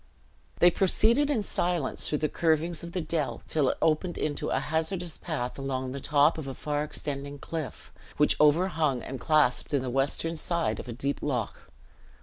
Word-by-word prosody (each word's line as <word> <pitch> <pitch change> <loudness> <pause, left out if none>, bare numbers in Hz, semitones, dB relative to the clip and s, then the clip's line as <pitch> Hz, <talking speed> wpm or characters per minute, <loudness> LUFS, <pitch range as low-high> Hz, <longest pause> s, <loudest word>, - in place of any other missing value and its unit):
They 175 - +6
proceeded 225 - +3
in 240 -8 +1
silence 175 -7 -1
through 150 - +1
the 155 - 0
curvings 165 +1 0
of 170 0 -8
the 185 - -1
dell 155 -2 -2
till 150 -4 +2
it - - -1
opened 165 +3 +1
into 145 -2 -2
a - - +1
hazardous 160 +3 -2
path 140 -6 -4
along 130 -1 -3
the 140 - -5
top 150 +3 +3
of 145 - -6
a 135 - -5
far 150 0 -2
extending 145 -1 -5
cliff, 150 -3 -6 0.2
which - - +3
overhung 150 -4 +3
and 135 -1 -6
clasped 150 0 +2
in 135 - +1
the 125 - -3
western 140 +5 0
side 170 +1 0
of - - -7
a - - -5
deep 140 +4 -3
loch. 125 -7 -3
150 Hz, 180 wpm, -28 LUFS, 135-170 Hz, 0.2 s, They